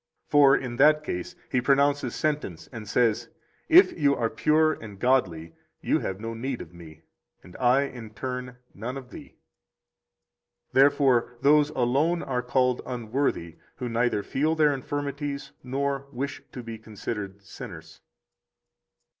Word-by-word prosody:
For 140 -2 +6
in 120 -2 -5
that 150 +2 +5
case 90 -11 -5 0.2
He 125 - +2
pronounces 140 -1 +2
sentence 145 - -2
and 110 -4 -8
says: 115 0 +1 0.4
74 345 +3 +7
If - - -12
you 140 -2 +3
are 115 -1 -1
pure 155 +1 +3
and 105 -7 -10
godly, 90 -11 +1 0.3
you - - +1
have 95 0 -4
no 115 +1 -5
need 125 +2 -4
of 80 - -10
Me, 80 -2 -13 0.4
and 90 - -15
I, 130 +2 +3
in 120 -5 -7
turn, 125 -1 -5 0.2
none 120 +6 -5
of 125 -3 -10
thee. - - -12 1.4
Therefore 135 -3 +3
those 150 +1 +5
alone 150 +6 +1
are 125 -2 -1
called 125 0 +1
unworthy 120 - -2 0.2
who 125 - -5
neither 115 -3 0
feel 155 +8 0
their 150 -2 +4
infirmities 140 +1 -4
nor 140 +1 -2
wish 135 +2 -4
to 125 - -8
be 115 -1 -7
considered 105 -2 -6
sinners. 95 - -10
125 Hz, 145 wpm, -26 LUFS, 115-140 Hz, 1.4 s, 74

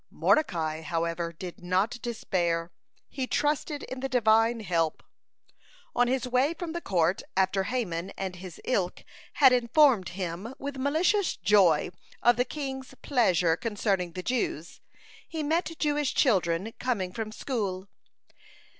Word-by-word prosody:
(121) - - -21 0.5
Mordecai, 160 - -7
however, 170 +1 -2
did 175 +2 -9
not 190 +7 0
despair; 175 -7 -1 0.4
he 260 -2 -4
trusted 295 +1 -1
in 260 - -6
the 270 +1 -3
Divine 225 -1 +3
help. 165 -5 -1 0.9
On 245 0 +3
his 255 0 0
way 255 +6 +2
from 335 0 -5
the 345 - -4
court, 175 - +1 0.2
after 190 0 +2
Haman 190 -8 -2
and 190 -2 -4
his 180 -2 -10
ilk 190 -8 -1 0.3
had 270 -3 +6
informed 245 - +4
him 190 +7 -4
with 280 0 -5
malicious 325 +8 +1
joy 185 -7 +4 0.3
of 240 0 +6
the 245 - +2
king's 265 -2 -6
pleasure 185 - +3
concerning 195 -4 -1
the 185 - -5
Jews, 195 - -2 0.5
he 320 -2 -3
met 330 +2 0
Jewish 295 -2 0
children 190 - +2
coming 210 -8 -1
from 220 +1 -4
school. 200 -6 -3
220 Hz, 135 wpm, -28 LUFS, 180-265 Hz, 0.9 s, had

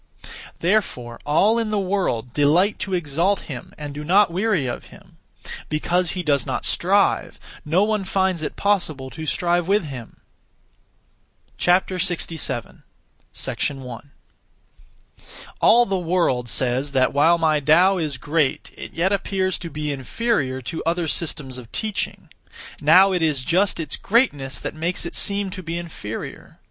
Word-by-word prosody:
Therefore 145 - 0
all 205 +10 +3
in 225 -2 -1
the 215 - 0
world 180 - -1
delight 165 +8 +3
to 190 -1 -2
exalt 175 +4 0
him 130 -5 -8
and 145 -1 -6
do 150 +1 -6
not 190 +4 +4
weary 190 -4 +1
of 120 - -4
him. - - -17 0.5
Because 170 +3 0
he 180 - -2
does 140 -5 +2
not - - -3
strive, - - +1 0.2
no 170 +6 +2
one 215 -1 0
finds 190 -3 0
it 155 - -4
possible 155 -10 0
to 160 -1 -7
strive 175 +2 +1
with 205 +1 +3
him. 130 -6 -8 1.4
67. 175 -3 0 0.9
1. 135 -1 -9 1.5
All 240 +1 +6
the 195 -3 -1
world 165 -9 0
says 130 +3 -1
that, 130 -1 +2
while 160 +5 +4
my 155 -2 +2
Tao 180 +7 +4
is 150 -5 -2
great, 150 -1 -1
it - - -9
yet 175 +4 +1
appears 190 -1 0
to 170 - -6
be 150 -1 -3
inferior 135 - -1
(to 145 +7 -4
other 170 0 0
systems 145 -5 -1
of 115 -3 -13
teaching). 215 -2 -3 0.5
Now 195 +1 +6
it 180 -2 0
is 150 -5 +1
just 185 +6 +1
its 160 - -3
greatness 145 - +1
that - - -4
makes 170 +3 -2
it 170 - -5
seem 200 -1 0
to 185 - -6
be 165 -1 -4
inferior. 160 -11 -7
165 Hz, 145 wpm, -22 LUFS, 145-190 Hz, 1.5 s, All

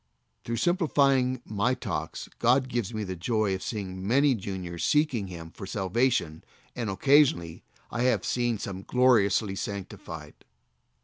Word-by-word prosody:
Through 115 - -3
simplifying 140 -8 +2
my 110 +4 0
talks - - -4
God 130 +2 +3
gives 120 -5 -2
me 110 -2 -3
the 95 -2 -4
joy 105 +3 0
of 95 - -3
seeing 95 -3 -5
many 140 +4 +4
juniors 95 -5 -5
seeking 145 -9 +2
Him 85 -2 -9
for 95 - -9
salvation, 95 -5 0 0.3
and 115 -4 -2
occasionally 100 - +3 0.3
I 120 - -2
have 125 -5 +2
seen 120 -2 0
some 95 -1 -5
gloriously 110 -4 +3
sanctified. 100 -1 -7
110 Hz, 135 wpm, -27 LUFS, 95-130 Hz, 0.3 s, many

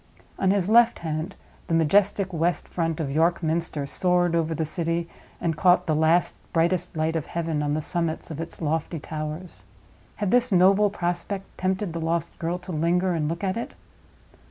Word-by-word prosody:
On 190 - +2
his 190 -2 +2
left 235 +2 +5
hand, 160 +4 -3 0.3
the 165 - +1
majestic 190 +4 +2
west 170 +2 0
front 165 -2 -2
of 145 -4 -2
York 165 +4 +2
Minster 160 -2 -1
soared 175 +4 +1
over 165 -1 0
the 160 - -1
city 165 +1 -1 0.3
and 165 -2 -1
caught 180 +2 +4
the 155 - +1
last 160 +3 +3 0.2
brightest 170 0 +1
light 160 +1 0
of 160 - -2
heaven 165 -3 -2
on 145 0 0
the 155 - -2
summits 165 -1 -2
of 160 +1 -5
its 165 0 -7
lofty 160 +2 -1
towers. 155 +4 -6 0.5
Had 205 -3 -1
this 245 -1 +3
noble 195 +3 +5
prospect 185 +1 -3
tempted 185 -1 -1
the 165 - -4
lost 165 0 -1
girl 170 +2 -1
to 180 +1 -9
linger 175 +3 +1
and 155 -3 -1
look 170 +3 -4
at 190 +2 0
it? 235 - -5
170 Hz, 180 wpm, -25 LUFS, 160-185 Hz, 0.5 s, left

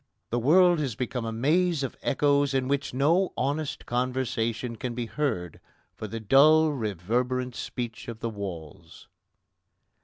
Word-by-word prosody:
The 120 - +1
world 175 +6 +5
has 135 -7 -2
become 125 -1 -3
a 115 - -3
maze 155 +6 +1
of 135 - -4
echoes 140 0 +2
in 130 -1 +1
which 140 0 -1
no 165 +9 +2
honest 145 +2 -2
conversation 120 -2 -2
can 120 0 -5
be 120 -1 -2
heard 110 - -3 0.3
for 110 - -7
the 115 +2 -5
dull 150 +8 +5
reverberant 125 - -2
speech 120 -2 -5
of 115 -2 -7
the 115 0 -3
walls. 90 -7 -8
125 Hz, 145 wpm, -27 LUFS, 115-145 Hz, 0.3 s, world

